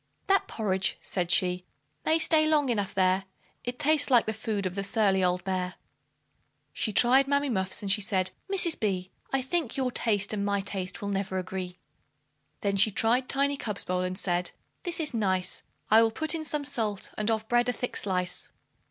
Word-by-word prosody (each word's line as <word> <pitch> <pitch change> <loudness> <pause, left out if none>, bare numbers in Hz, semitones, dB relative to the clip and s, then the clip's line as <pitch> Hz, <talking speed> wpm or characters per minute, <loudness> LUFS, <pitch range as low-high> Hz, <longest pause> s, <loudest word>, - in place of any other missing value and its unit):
"That 390 0 +2
porridge," 190 -4 -1
said 175 -3 -3
she 180 0 +2 0.4
"may 315 - +3
stay 315 -1 +3
long 300 -3 +2
enough 205 -5 -1
there, 190 0 +2 0.4
It 245 0 -4
tastes 295 0 +2
like 245 -3 +5
the 220 - -2
food 215 -2 -3
of 185 - -2
the 195 +1 -3
surly 195 -2 +2
old 180 0 +1
bear," 185 -1 -2 1.0
She 215 - -1
tried 255 +5 +5
Mammy 285 0 +1
Muff's, 190 -3 0
and 195 - 0
she 210 +2 +3
said, 190 -2 +1 0.2
"Mrs. 365 -4 +5
B, 185 -3 -2 0.2
I 270 -1 0
think 285 -2 -1
your 260 -2 0
taste 210 -4 +1
and 200 -1 -1
my 200 0 0
taste 195 -1 -4
will 200 - -2
never 195 -1 -2
agree." 185 -1 -5 0.8
Then 200 -2 0
she 205 - +5
tried 235 +5 +1
Tiny 280 +1 +1
Cub's 210 -6 -4
bowl, 180 0 -1
and 185 0 -2
said, 175 -1 0 0.3
"This 350 -2 -2
is 305 -4 -1
nice; 185 -5 -1 0.3
I 220 +1 +8
will 225 - +4
put 315 +8 0
in 325 -1 -3
some 300 -1 -2
salt, 215 -7 -2
and 215 +1 -1
of 220 -1 0
bread 240 +1 +2
a - - +3
thick 245 +1 -5
slice." 180 -2 -2
210 Hz, 195 wpm, -28 LUFS, 190-260 Hz, 1.0 s, I